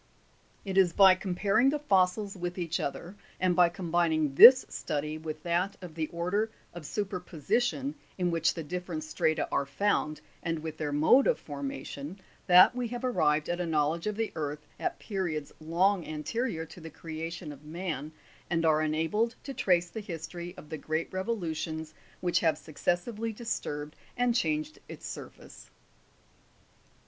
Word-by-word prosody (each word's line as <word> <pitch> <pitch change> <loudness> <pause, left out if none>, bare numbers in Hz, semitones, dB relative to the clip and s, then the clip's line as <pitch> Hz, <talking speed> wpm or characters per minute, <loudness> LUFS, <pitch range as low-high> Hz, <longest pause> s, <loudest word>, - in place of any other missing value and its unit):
4. 195 - -4
It 190 - -2
is 180 -3 +4
by 195 -2 +8
comparing 195 +6 +2
the 300 - +1
fossils 200 -5 +1
with 175 -1 -4
each 170 -2 -1
other, 170 +7 -4 0.2
and 185 -1 +2
by 175 -1 +6
com 170 -1 -6
bining 160 -4 +2
this 255 - +10
study 150 +1 -3
with 155 -1 -6
that 180 +3 0
of 180 -4 -9
the 160 -1 -2
order 180 +7 -1 0.2
of 170 -4 -8
superposition, 205 - -1 0.2
in 180 -2 +1
which 165 -1 +2
the 165 - -4
different 175 0 -4
strata 155 0 0
are 140 - 0
found, 155 -1 0 0.2
and 165 -1 -1
with 160 0 -6
their 150 -2 -2
mode 155 - +5
of - - +3
formation, 140 +3 -6 0.3
that 180 +6 +8
we 250 -1 -1
have 245 +2 -4
arrived 155 -11 +2
at 175 0 -1
a - - -1
knowledge 160 +3 +1
of 210 - -1
the 225 0 -2
earth 150 -1 -4
at - - -2
periods 175 -8 -3
long 175 +4 +2
anterior 160 +3 -2
to 165 +2 -13
the 160 - -8
creation 160 0 -6
of 145 0 -12
man, 155 -2 -4 0.4
and 165 -1 +1
are 155 -1 +4
enabled 165 +10 0
to 275 - -6
trace 175 -6 +2
the 220 - -5
his 165 -6 -6
tory 175 +1 -8
of 150 - -12
the 155 - -5
great 160 +3 -2
revolutions 160 -6 -3 0.3
which 175 -1 +2
have 160 -3 +2
successively 175 +9 -2
disturbed 150 -10 -4 0.2
and 245 -1 +3
changed 305 +5 -1
its - - -9
surface. - - -9
175 Hz, 165 wpm, -29 LUFS, 155-195 Hz, 0.4 s, this